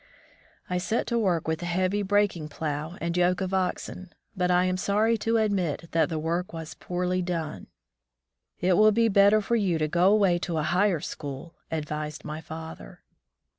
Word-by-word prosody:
I 180 Hz, 0 st, -1 dB
set 220 Hz, +6 st, -1 dB
to 235 Hz, -1 st, 0 dB
work 180 Hz, -8 st, 0 dB
with 160 Hz, 0 st, -1 dB
the 175 Hz, -, -4 dB
heavy 185 Hz, +3 st, 0 dB
breaking 200 Hz, -6 st, +1 dB
plow 155 Hz, +3 st, -4 dB
and 170 Hz, 0 st, -2 dB
yoke 180 Hz, 0 st, +2 dB
of 190 Hz, 0 st, -3 dB
oxen, 185 Hz, -1 st, -2 dB, 0.2 s
but 180 Hz, -1 st, 0 dB
I 180 Hz, 0 st, +4 dB
am 185 Hz, 0 st, +1 dB
sorry 210 Hz, +4 st, +2 dB
to 225 Hz, +2 st, +1 dB
admit 185 Hz, -7 st, 0 dB
that 165 Hz, -2 st, +2 dB
the 160 Hz, -, -2 dB
work 170 Hz, +3 st, -2 dB
was 160 Hz, -1 st, -6 dB
poorly 180 Hz, +1 st, -2 dB
done. 165 Hz, -, -4 dB, 0.9 s
"It 180 Hz, 0 st, +2 dB
will 215 Hz, 0 st, +6 dB
be 230 Hz, +1 st, +3 dB
better 200 Hz, +1 st, +5 dB
for 235 Hz, +3 st, 0 dB
you 195 Hz, -7 st, +1 dB
to 155 Hz, -1 st, 0 dB
go 175 Hz, +5 st, +3 dB
away 195 Hz, -5 st, +3 dB
to 170 Hz, -2 st, -3 dB
a 155 Hz, -, 0 dB
higher 180 Hz, +1 st, +2 dB
school," 145 Hz, 0 st, -7 dB, 0.2 s
advised 150 Hz, -1 st, -4 dB
my 155 Hz, +1 st, -5 dB
father. 160 Hz, -, -9 dB
180 Hz, 180 wpm, -27 LUFS, 160-200 Hz, 0.9 s, will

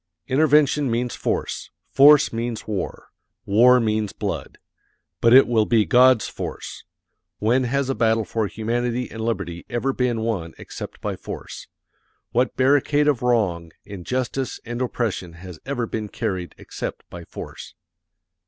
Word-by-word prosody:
Intervention 145 Hz, 0 st, +3 dB
means 120 Hz, +1 st, -1 dB
force. -, -, -3 dB, 0.2 s
Force 145 Hz, 0 st, +6 dB
means 115 Hz, -1 st, -3 dB
war. 105 Hz, -4 st, -5 dB, 0.3 s
War 125 Hz, +5 st, +6 dB
means 110 Hz, -2 st, -1 dB
blood. -, -, -5 dB, 0.6 s
But 115 Hz, -, +4 dB
it 130 Hz, +2 st, +8 dB
will 110 Hz, -3 st, +2 dB
be 110 Hz, -3 st, +3 dB
God's 125 Hz, -2 st, +5 dB
force. -, -, -7 dB, 0.5 s
When 125 Hz, +4 st, +2 dB
has 140 Hz, +2 st, 0 dB
a 135 Hz, -, 0 dB
battle 110 Hz, -2 st, +1 dB
for 110 Hz, 0 st, -1 dB
humanity 120 Hz, +4 st, -2 dB
and 115 Hz, -, -7 dB
liberty 85 Hz, -7 st, -3 dB
ever 120 Hz, +3 st, -1 dB
been 125 Hz, -3 st, 0 dB
won 100 Hz, -8 st, -3 dB
except -, -, -9 dB
by -, -, -3 dB
force? -, -, -8 dB, 0.6 s
What 125 Hz, +1 st, 0 dB
barricade 145 Hz, +2 st, +3 dB
of 145 Hz, -5 st, +2 dB
wrong, 95 Hz, -10 st, 0 dB
injustice, 125 Hz, +7 st, -3 dB
and 120 Hz, +1 st, -4 dB
oppression 115 Hz, -8 st, -2 dB
has 85 Hz, 0 st, -11 dB
ever 130 Hz, -4 st, -1 dB
been 110 Hz, -2 st, -4 dB
carried 95 Hz, -7 st, -4 dB
except -, -, -7 dB
by 85 Hz, -1 st, -8 dB
force? -, -, -10 dB
115 Hz, 140 wpm, -23 LUFS, 105-130 Hz, 0.6 s, it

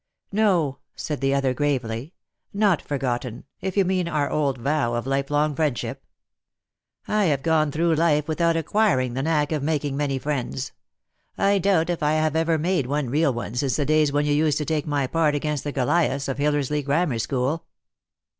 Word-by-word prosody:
" -, -, -65 dB
No," 185 Hz, -10 st, +1 dB, 0.2 s
said 150 Hz, -2 st, -4 dB
the 135 Hz, 0 st, +2 dB
other 135 Hz, -2 st, +1 dB
gravely, 130 Hz, 0 st, -2 dB, 0.2 s
" -, -, -50 dB
not 190 Hz, -6 st, +3 dB
forgotten, 125 Hz, -3 st, -3 dB, 0.2 s
if 190 Hz, +1 st, -3 dB
you 195 Hz, -, +4 dB
mean 185 Hz, -1 st, 0 dB
our 150 Hz, -4 st, -1 dB
old 140 Hz, -3 st, 0 dB
vow 125 Hz, -1 st, 0 dB
of 120 Hz, -, -2 dB
life 135 Hz, 0 st, -1 dB
long 150 Hz, +1 st, +1 dB
friendship. 145 Hz, -6 st, -2 dB, 1.0 s
I 210 Hz, -1 st, +2 dB
have 140 Hz, -5 st, +1 dB
gone 160 Hz, -2 st, +2 dB
through 165 Hz, +3 st, +1 dB
life 155 Hz, -2 st, +2 dB
without 165 Hz, +1 st, +1 dB
acquiring 160 Hz, -, +1 dB
the 130 Hz, -, -2 dB
knack 150 Hz, 0 st, +1 dB
of 155 Hz, -2 st, -1 dB
making 145 Hz, -2 st, -1 dB
many 140 Hz, -1 st, -1 dB
friends. 135 Hz, -1 st, -3 dB, 0.7 s
I 200 Hz, 0 st, +3 dB
doubt 175 Hz, -3 st, +2 dB
if 175 Hz, -, -3 dB
I 150 Hz, 0 st, +2 dB
have 155 Hz, 0 st, +1 dB
ever 165 Hz, 0 st, +2 dB
made 165 Hz, -4 st, 0 dB
one 140 Hz, -2 st, -1 dB
real 150 Hz, 0 st, +3 dB
one 120 Hz, -3 st, -5 dB
since 125 Hz, 0 st, 0 dB
the 145 Hz, -, 0 dB
days 155 Hz, 0 st, +3 dB
when 145 Hz, +1 st, +1 dB
you 145 Hz, -, +1 dB
used 150 Hz, 0 st, +2 dB
to 150 Hz, -, -2 dB
take 155 Hz, -1 st, -1 dB
my 145 Hz, -2 st, 0 dB
part 155 Hz, +1 st, +1 dB
against 150 Hz, -1 st, -2 dB
the 145 Hz, -, -3 dB
Goliaths 140 Hz, +1 st, +1 dB
of 135 Hz, 0 st, -3 dB
Hillersley 145 Hz, 0 st, +1 dB
Grammar 140 Hz, -3 st, 0 dB
school." 135 Hz, +6 st, -1 dB
150 Hz, 190 wpm, -24 LUFS, 135-160 Hz, 1.0 s, you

